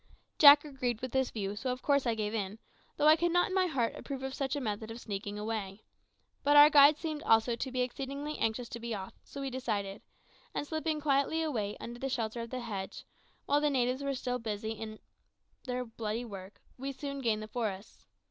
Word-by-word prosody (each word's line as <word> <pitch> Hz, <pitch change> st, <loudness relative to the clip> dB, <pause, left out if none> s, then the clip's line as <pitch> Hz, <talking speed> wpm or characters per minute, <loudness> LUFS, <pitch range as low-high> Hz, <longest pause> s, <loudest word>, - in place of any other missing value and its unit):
Jack 290 Hz, 0 st, +10 dB
agreed 255 Hz, -5 st, -2 dB
with 255 Hz, 0 st, -5 dB
this 265 Hz, -1 st, +1 dB
view, 200 Hz, -2 st, -3 dB
so 255 Hz, +4 st, -2 dB
of 250 Hz, +1 st, -5 dB
course 280 Hz, -3 st, +2 dB
I 230 Hz, -, +2 dB
gave 215 Hz, -1 st, -2 dB
in, 205 Hz, -1 st, -3 dB, 0.4 s
though 295 Hz, -, +2 dB
I 310 Hz, +1 st, +8 dB
could 345 Hz, +1 st, +1 dB
not 355 Hz, +2 st, +3 dB
in -, -, -4 dB
my 375 Hz, -1 st, +3 dB
heart 250 Hz, -8 st, 0 dB
approve 270 Hz, -1 st, -6 dB
of 265 Hz, 0 st, -3 dB
such 275 Hz, 0 st, -2 dB
a -, -, -1 dB
method 220 Hz, -3 st, -3 dB
of 225 Hz, +1 st, -7 dB
sneaking 205 Hz, -2 st, -5 dB
away. 210 Hz, -2 st, -4 dB, 0.6 s
But 290 Hz, +1 st, +5 dB
our 295 Hz, +1 st, +10 dB
guide 290 Hz, +1 st, +8 dB
seemed 310 Hz, -2 st, -4 dB
also 225 Hz, -3 st, +3 dB
to 260 Hz, +3 st, -4 dB
be 255 Hz, 0 st, 0 dB
exceedingly 275 Hz, +4 st, -4 dB
anxious 225 Hz, +2 st, -1 dB
to 235 Hz, -, -6 dB
be 235 Hz, -1 st, -3 dB
off, 190 Hz, -1 st, -7 dB
so 280 Hz, -, -8 dB
we 270 Hz, -1 st, -3 dB
decided; 210 Hz, -6 st, -3 dB, 0.5 s
and -, -, -1 dB
slipping 315 Hz, 0 st, -2 dB
quietly 285 Hz, +2 st, +2 dB
away 215 Hz, -10 st, -2 dB
under 240 Hz, +1 st, -7 dB
the 270 Hz, -, -2 dB
shelter 235 Hz, -2 st, -2 dB
of 230 Hz, -, -6 dB
the 255 Hz, +1 st, -4 dB
hedge, 200 Hz, -5 st, -6 dB, 0.4 s
while 290 Hz, +1 st, +2 dB
the 295 Hz, -, +3 dB
natives 255 Hz, -1 st, +1 dB
were 280 Hz, -1 st, -1 dB
still 250 Hz, 0 st, -2 dB
busy 220 Hz, -1 st, -3 dB
with 215 Hz, -1 st, -7 dB, 0.7 s
their 250 Hz, -1 st, -2 dB
bloody 225 Hz, 0 st, -4 dB
work, 195 Hz, -2 st, -10 dB, 0.2 s
we 275 Hz, +1 st, -3 dB
soon 280 Hz, 0 st, -5 dB
gained 220 Hz, -3 st, 0 dB
the -, -, -7 dB
forest. 195 Hz, -, -5 dB
250 Hz, 215 wpm, -31 LUFS, 220-280 Hz, 0.7 s, Jack